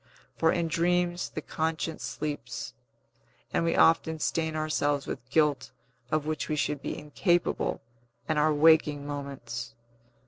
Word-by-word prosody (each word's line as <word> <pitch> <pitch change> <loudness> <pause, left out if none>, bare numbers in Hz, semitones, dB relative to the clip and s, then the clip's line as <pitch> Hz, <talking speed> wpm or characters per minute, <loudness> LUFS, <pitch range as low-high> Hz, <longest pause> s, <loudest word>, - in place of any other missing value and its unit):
For 160 - +3
in 170 -2 0
dreams 175 +1 +1
the 155 - -6
conscience 160 0 -2
sleeps, 145 -5 -4 0.8
and - - +2
we 165 - +1
often 160 0 +4
stain 160 +1 -1
ourselves 145 -2 0
with 125 - -6
guilt 150 -1 +2 0.4
of 155 +1 0
which 155 -1 -2
we 155 - +1
should 145 -1 -1
be - - -4
incapable 175 +4 0 0.5
in 155 -1 +1
our 155 +1 +4
waking 150 -1 +4
moments. 130 -5 -6
155 Hz, 135 wpm, -28 LUFS, 145-160 Hz, 0.8 s, often